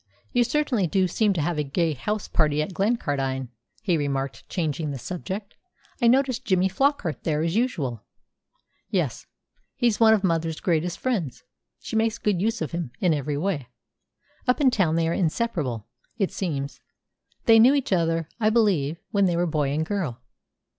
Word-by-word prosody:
"You 245 - +4
certainly 245 -6 +1
do 185 +3 +2
seem 210 +4 +2
to 170 - -1
have 160 +1 -1
a - - +1
gay 160 +3 0
house 210 +9 -3
party 150 -2 +1
at 185 - -6
Glencardine," 140 - -1 0.3
he 180 -6 +2
remarked, 140 -2 -3
changing 160 -3 -2
the 140 - -4
subject. 190 - -6 0.5
"I 235 - +5
noticed 255 0 +3
Jimmy 190 -4 +2
Flockart 200 - 0
there 155 -1 0
as 165 +2 -1
usual." 150 - -1 0.9
"Yes. - - -1 0.5
He's 235 -5 +1
one 220 -1 +7
of 205 - -2
mother's 165 -3 0
greatest 175 0 0
friends. 200 - -2 0.4
She - - -6
makes 225 0 +1
good 205 -6 0
use 225 -3 0
of 160 - -5
him 170 -5 -3
in 180 -4 +3
every 145 0 -2
way. 155 -6 -2 0.8
Up 250 - +3
in 270 -3 +4
town 180 -9 +2
they 165 -1 +2
are 165 - 0
inseparable, 160 - -1 0.3
it 195 -5 0
seems. 140 -7 -3 0.7
They 225 -1 +7
knew 255 +5 +7
each 270 -8 0
other, 165 -2 +1
I 215 -1 +3
believe, 190 -10 +2
when 200 -3 +3
they 175 -2 +1
were 175 - +2
boy 150 -4 0
and 155 +3 0
girl." 165 - -2
175 Hz, 175 wpm, -25 LUFS, 150-220 Hz, 0.9 s, one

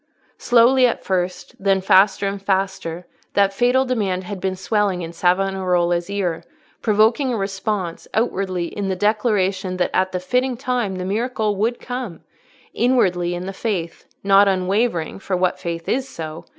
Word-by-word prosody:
Slowly 245 +2 +5
at 235 - -3
first, 180 -1 -2
then 195 -1 +2
faster 195 +1 +4
and 195 0 -4
faster, 190 -3 -2 0.3
that 200 -1 +3
fatal 250 +5 +2
demand 200 -7 -1
had 190 0 -7
been 190 -1 -1
swelling 195 -2 0
in 165 0 -7
Savonarola's 180 -1 +1
ear, 180 -5 -2 0.4
provoking 225 +5 +3
a 235 - -1
response, 195 -3 -3
outwardly 190 -6 0
in 195 +3 -4
the 190 - 0
declaration 195 -3 0
that 180 - 0
at 185 0 +1
the 180 - -2
fitting 250 +6 0
time 245 -6 -1
the 185 0 -4
miracle 215 +1 -1
would 225 +5 -1
come; 245 -9 -6 0.5
inwardly 180 -8 +2
in 175 +1 -5
the 195 - -5
faith—not 195 0 +1
unwavering, 190 -1 0
for 190 -1 -2
what 180 0 0
faith 170 -1 -5
is 265 +2 -1
so? 160 -4 -7
195 Hz, 150 wpm, -21 LUFS, 180-220 Hz, 0.5 s, Slowly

